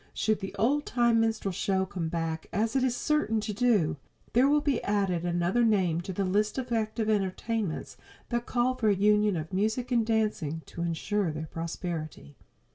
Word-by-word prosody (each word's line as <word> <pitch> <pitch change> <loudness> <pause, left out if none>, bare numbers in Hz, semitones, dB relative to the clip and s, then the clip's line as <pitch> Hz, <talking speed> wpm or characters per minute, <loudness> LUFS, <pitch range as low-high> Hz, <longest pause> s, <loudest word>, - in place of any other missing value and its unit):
Should 215 -1 +1
the 195 -2 -6
old 285 +6 +1
time 235 -2 +3
minstrel 225 -3 0
show 190 +1 0
come 175 -4 -4
back, 165 -1 -3
as 220 +5 0
it 265 - +3
is 250 -1 +1
certain 300 -8 +1
to 210 0 -3
do, 210 -10 +2 0.4
there 255 +4 +5
will 295 +1 +4
be 285 -4 0
added 195 -4 0
another 175 +6 +1
name 185 -7 +2
to 190 +2 -6
the 195 +2 -1
list 210 +5 +1
of 255 -2 -4
active 220 -1 -1
entertainments 205 -2 -1 0.3
that 240 -1 -2
call 250 +1 +1
for 230 -4 +1
a 200 - +4
union 210 -1 +3
of 160 +3 -6
music 220 +6 0
and 235 -2 +3
dancing 210 -9 -1
to 170 - -8
insure 170 +3 -1
their 155 +1 -5
prosperity. 160 - -5
210 Hz, 185 wpm, -28 LUFS, 175-230 Hz, 0.4 s, there